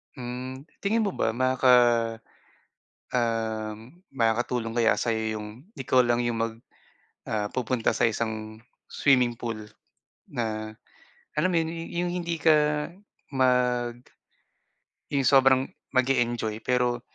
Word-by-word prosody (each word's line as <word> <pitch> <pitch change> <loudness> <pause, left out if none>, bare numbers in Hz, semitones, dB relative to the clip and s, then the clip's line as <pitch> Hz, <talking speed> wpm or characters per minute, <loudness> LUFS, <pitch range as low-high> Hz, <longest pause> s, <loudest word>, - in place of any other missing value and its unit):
Hmm, 130 +1 -6 0.2
tingin 220 +3 +1
mo 200 - 0
ba 115 - -1
maka 130 +1 +1 1.4
uhm, 115 - -3
makakatulong 115 0 0
kaya 115 -1 +4
sayo 110 -2 -1
'yung 105 - -6 0.3
ikaw 130 - +2
lang 120 0 +2
'yung 120 -1 -1
mag 115 0 -1 0.8
ah 105 -1 -2
pupunta 125 -1 0
sa - - +2
isang 110 -1 -4 0.3
swimming 125 -4 +3
pool, 110 -3 -5 0.6
na 110 -4 -3 0.6
alam 175 +5 +1
mo 175 - +1
'yun 160 0 -1 0.2
'yung 175 +1 -1
hindi 170 -2 -2
ka 155 +1 +5 0.8
mag 125 -2 +2 1.1
'Yung 140 -2 0
sobrang 135 0 +5 0.2
mag-e-enjoy 120 -4 0
pero, 125 0 +1
120 Hz, 110 wpm, -26 LUFS, 115-130 Hz, 1.4 s, ka